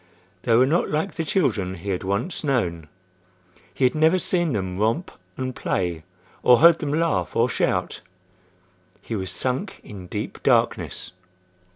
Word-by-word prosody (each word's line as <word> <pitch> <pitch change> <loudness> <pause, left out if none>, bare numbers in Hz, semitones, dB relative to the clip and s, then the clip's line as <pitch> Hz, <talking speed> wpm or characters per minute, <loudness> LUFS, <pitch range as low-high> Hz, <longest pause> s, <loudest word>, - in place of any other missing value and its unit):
They 115 +1 +2
were 125 +3 +6
not 160 +6 +1
like 155 +6 -1
the 165 - -2
children 115 - 0
he 95 +3 -5
had 90 - -2
once 100 - -2
known. 90 - -1 0.8
He - - -3
had 125 - +4
never 160 +3 +4
seen 175 -3 0
them 95 -4 -3
romp 115 - 0 0.3
and 130 -1 -3
play 85 -3 -2 0.4
or 125 -1 +6
heard 165 +3 +6
them 145 -3 -2
laugh 165 +1 0
or 115 +1 +3
shout. 120 - -1 1.0
He 115 - -4
was 95 -3 -3
sunk 130 +10 -3
in 95 -4 -10
deep - - -5
darkness. - - +1
125 Hz, 155 wpm, -23 LUFS, 95-160 Hz, 1.0 s, were